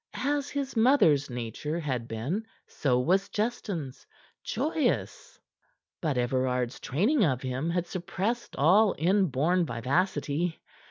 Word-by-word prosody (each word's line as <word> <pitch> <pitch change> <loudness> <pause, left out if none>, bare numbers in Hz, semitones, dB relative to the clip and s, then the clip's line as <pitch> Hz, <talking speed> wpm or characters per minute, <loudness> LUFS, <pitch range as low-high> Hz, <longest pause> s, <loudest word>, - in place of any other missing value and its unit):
As 285 0 0
his 280 -2 -3
mother's 220 - +4
nature 125 +7 -4
had 130 -7 -3
been, 145 - -3 0.2
so 125 -4 0
was 190 +9 +2
Justin's 200 - -3 0.4
joyous. - - -2 0.6
But 150 -5 0
Everard's 125 0 0
training 215 - +1
of 130 -7 +1
him 130 +5 -2
had 175 0 0
suppressed 195 +6 -3
all 190 +8 +4
inborn 175 -1 +2
vivacity. 150 +6 -1
165 Hz, 110 wpm, -28 LUFS, 130-200 Hz, 0.6 s, mother's